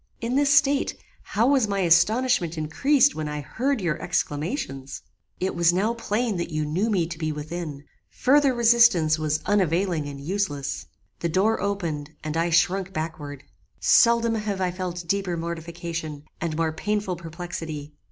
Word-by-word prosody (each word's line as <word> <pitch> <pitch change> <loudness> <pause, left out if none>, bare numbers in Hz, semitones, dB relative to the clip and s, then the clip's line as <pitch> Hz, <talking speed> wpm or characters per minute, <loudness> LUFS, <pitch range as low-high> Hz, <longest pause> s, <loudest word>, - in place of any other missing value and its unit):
In 235 +2 -2
this 285 0 +3
state, 280 0 +3 0.3
how 220 +3 0
was 265 -6 +3
my 200 -1 -1
astonishment 175 +1 +3
increased 270 - +3
when 155 -1 -4
I 150 0 -4
heard 260 - -1
your 170 -4 -1
exclamations! 150 - -3 0.4
"It 190 +1 -1
was 170 0 +4
now 200 +6 +1
plain 230 -2 -1
that 170 - -3
you 155 -2 -2
knew 180 +9 0
me 185 -6 +1
to 165 -1 -7
be 155 -1 -1
within. 150 -1 -6 0.3
Further 280 +1 +3
resistance 230 -10 +4
was 155 -1 0
unavailing 180 -5 +1
and 140 -1 -7
useless. 145 -3 -3 0.3
The 170 - -1
door 200 +7 +2
opened, 165 -7 -3
and 155 0 -4
I 165 +1 +1
shrunk 185 +3 +2
backward. 150 -4 -5 0.4
Seldom 235 -1 +4
have 210 -3 -2
I 185 -1 0
felt 175 -1 -5
deeper 195 -2 -1
mortification, 165 -2 -5 0.2
and 160 -2 -2
more 165 -1 +1
painful 205 +1 -2
perplexity. 165 -3 -7
175 Hz, 155 wpm, -25 LUFS, 155-210 Hz, 0.4 s, was